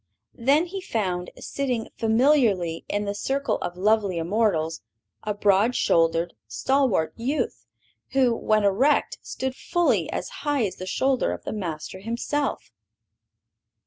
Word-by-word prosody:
Then 280 +8 +3
he 380 +2 -6
found, 185 - -2
sitting 250 -5 -3
familiarly 220 - +2
in 205 0 -1
the 200 - -2
circle 270 +7 -1
of 175 - -5
lovely 205 -2 +2
immortals, 165 -3 0 0.4
a 210 -1 -3
broad 205 +4 +3
shouldered, 165 +1 +2
stalwart 255 - +1
youth, 245 - -2 0.5
who, 255 -3 +3
when 215 -1 +1
erect, 235 +10 +2
stood 260 0 -4
fully 345 +4 +1
as - - -3
high 290 -6 +1
as 185 -2 -5
the 185 - -7
shoulder 260 +5 +1
of - - -8
the - - -4
Master 175 -3 -5
himself. 235 +7 -2
220 Hz, 130 wpm, -25 LUFS, 185-265 Hz, 0.5 s, Then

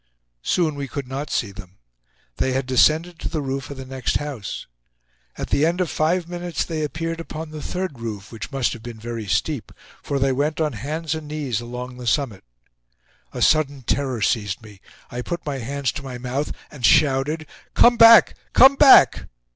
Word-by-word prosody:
Soon 165 - +1
we 140 -1 -5
could 135 +2 -6
not 140 +3 -5
see 105 - -1
them. 95 -2 -12 0.6
They 130 - 0
had 135 0 -1
descended 160 +6 +2
to - - -4
the 160 - -2
roof 135 -1 -4
of 140 - -8
the 130 - -7
next 130 -2 -1
house. 140 -9 -6 0.7
At - - -5
the 140 - +2
end 170 +3 +1
of 180 -3 0
five 170 +2 0
minutes 175 -1 -3
they 160 -2 -3
appeared 165 +2 -3
upon 160 -1 -7
the 155 -1 -7
third 180 -8 -4
roof, 105 -4 -6
which 115 +4 -7
must 135 -4 0
have 120 - -9
been 120 -1 -9
very 115 -1 -6
steep, 95 - -1 0.3
for 140 - -2
they 135 0 +2
went 145 +4 -1
on 155 -3 0
hands 150 +7 -3
and 160 -1 -6
knees 145 -6 -3
along 125 +1 -7
the 125 -1 -7
summit. 120 -8 0 0.9
A - - -2
sudden 145 -4 +2
terror 130 -3 -1
seized 105 -1 -1
me. 105 -3 -14 0.3
I 125 - -4
put 170 +6 -5
my 140 -2 -3
hands 140 +2 -2
to - - -7
my 130 -2 -6
mouth 130 +4 -3 0.2
and 135 -4 -12
shouted: 140 +7 +3 0.3
"Come 240 0 +6
back! 230 -1 +8 0.2
Come 270 +1 +7
back!" 265 - +7
140 Hz, 190 wpm, -22 LUFS, 125-155 Hz, 0.9 s, back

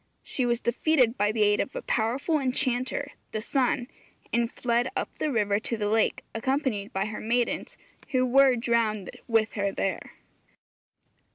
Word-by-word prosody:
She 255 -3 -1
was 240 -1 +1
defeated 250 0 +2
by 205 -2 +2
the 215 -1 +2
aid 205 0 +3
of 270 - -2
a - - -4
powerful 260 +8 0
enchanter 260 +1 -1 0.2
(the 215 - -1
sun), 250 +2 0 0.5
and 235 0 +1
fled 240 +1 0
up 385 - -3
the 305 - 0
river 205 -4 +1
to 230 +1 -2
the 205 -1 -1
lake, 220 +1 +1
accompanied 235 -4 -1
by 195 +1 -1
her 215 0 -5
maidens, 235 +2 -1 0.3
who 255 -3 +1
were 265 +1 +5
drowned 230 -4 0 0.2
with 225 -1 +2
her 200 -2 0
there. 195 -1 -3
235 Hz, 160 wpm, -27 LUFS, 215-260 Hz, 0.5 s, were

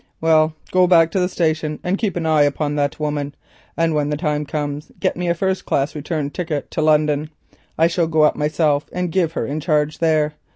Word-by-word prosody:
"Well, 160 -1 +3 0.2
go 185 0 +4
back 165 -2 +5
to 190 - 0
the 180 0 +1
station 155 -3 -1
and 180 +2 0
keep 205 -2 -2
an 170 -2 -2
eye 155 -2 +3
upon 145 +1 +1
that 145 0 -1
woman, 145 -1 -3 0.4
and 165 -1 +1
when 150 -1 0
the 150 - -1
time 150 -2 -2
comes 145 0 -4
get - - 0
me 180 0 -3
a 170 - +1
first 190 +2 -1
class 140 +1 0
return 150 -1 -3
ticket 160 -5 -4
to - - -2
London. 150 -1 +2 0.5
I 160 - +4
shall 170 0 +1
go 160 -1 +2
up 150 - +4
myself 150 -1 0
and 180 -1 -2
give 170 -2 +1
her 115 - -2
in 145 +5 -3
charge 150 -1 0
there. 155 -2 +2
155 Hz, 215 wpm, -20 LUFS, 150-165 Hz, 0.5 s, back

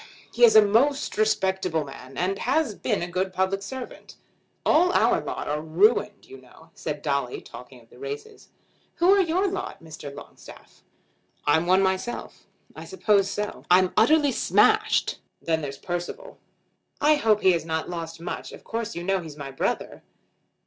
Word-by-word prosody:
He 240 - +1
is 230 -2 +8
a 215 - +9
most 270 +8 +1
respectable 190 -6 0
man; 135 -1 -11
and 190 +2 -1
has 275 -1 0
been 190 - -2
a - - -3
good 185 +2 -2
public 190 +1 -1
servant." 255 +5 -8 0.5
"All 355 +4 +4
our - - +3
lot - - -5
are 150 +1 -2
ruined, 205 +6 +2
you 135 0 -13
know," 125 - -19
said 150 -2 -5
Dolly, 140 -4 -1
talking 125 +1 -13
of 115 - -25
the 125 - -16
races. 140 +1 -8 0.5
"Who 350 +2 +4
are 400 - +5
your 365 +3 +1
lot, 380 - -5
Mr. 155 -3 -9
Longstaff?" 140 - -14 0.6
"I'm 160 +4 +2
one 185 +2 +4
myself." 190 +5 -3 0.3
"I - - -8
suppose 210 - +1
so." 210 +1 -4
"I'm 180 +1 +4
utterly 290 +6 +4
smashed. - - +2 0.2
Then 160 -1 -1
there's 140 -2 -6
Percival." 180 - -6 0.6
"I 300 +1 +4
hope 220 -6 +2
he 190 - +5
has 170 -3 0
not 160 0 -3
lost 165 -2 -6
much. 170 - -6
Of - - -12
course 230 0 -4
you 170 - -5
know 195 +1 +1
he's 155 -3 -10
my 140 -2 -7
brother." 135 - -3
190 Hz, 170 wpm, -25 LUFS, 160-225 Hz, 0.6 s, a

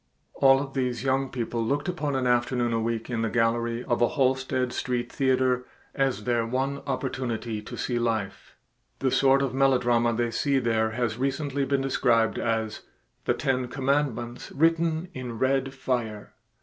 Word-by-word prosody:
All 135 0 +5
of 135 -1 -5
these 125 -3 -1
young 135 0 +1
people 120 -2 -2
looked 140 +10 -1
upon 150 -6 -2
an 130 -1 0
afternoon 120 -1 +1
a 115 - +1
week 115 0 -2
in 115 -2 -1
the 115 - 0
gallery 115 +1 0
of 120 -2 -1
a 120 - +5
Halsted 130 -2 0
Street 125 -1 -2
theater 130 -2 +2 0.3
as 135 -2 0
their 120 -2 +1
one 135 +4 -1
opportunity 120 -5 -3
to 105 - -8
see 120 -2 -1
life. 110 -4 -3 0.4
The 135 -1 0
sort 135 +1 +4
of 135 - -1
melodrama 125 -3 +3
they 120 0 0
see 140 +3 +1
there 115 -3 +1
has 120 -1 -1
recently 140 +1 -1
been 140 0 +1
described 115 -4 +2
as 110 -2 -1 0.4
"the - - +2
ten 130 -1 0
commandments 130 -2 -1
written 165 +2 +2
in 125 -3 -6
red 135 +1 +1
fire." 120 -6 -3
125 Hz, 160 wpm, -26 LUFS, 115-135 Hz, 0.4 s, All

